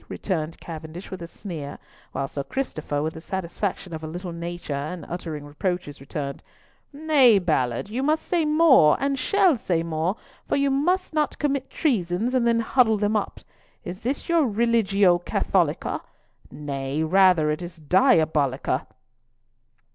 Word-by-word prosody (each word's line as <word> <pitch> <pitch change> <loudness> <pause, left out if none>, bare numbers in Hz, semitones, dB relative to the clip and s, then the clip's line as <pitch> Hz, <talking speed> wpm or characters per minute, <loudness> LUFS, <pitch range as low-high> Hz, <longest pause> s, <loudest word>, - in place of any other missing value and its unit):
returned 165 -4 -3
Cavendish 165 +2 -8
with 190 -2 -6
a 170 - -6
sneer; 165 -6 -7 0.3
while 135 - -2
Sir 140 0 -4
Christopher, 155 - -3
with 160 +1 -2
the 160 - -9
satisfaction 190 0 -4
of 160 0 -6
a - - -4
little 175 +3 -6
nature 170 -2 -5
in 175 0 -7
uttering 160 -4 -6
reproaches, 145 -1 -3
returned—"Nay, 245 - 0
Ballard, 145 - 0
you 230 +5 -3
must 310 +3 +1
say 345 -2 +1
more 300 - +5
and 275 -1 0
shall 370 +1 +3
say 170 -6 -1
more, 165 +3 -1 0.3
for - - +1
you 280 0 +2
must 355 +7 +1
not 305 -1 0
commit 275 -2 -1
treasons 220 - 0
and 250 -2 +2
then 230 0 +3
huddle 225 -2 +3
them 205 +1 0
up. 210 - -2 0.4
Is 180 +2 -6
this 255 +5 -3
your 335 -5 +3
Religio 205 -5 +3
Catholica? 175 - 0 0.5
Nay, 140 0 -3
rather 180 -2 +4
it 150 - -3
is 175 -1 -7
Diabolica." 150 -5 +2
180 Hz, 145 wpm, -24 LUFS, 155-250 Hz, 0.5 s, more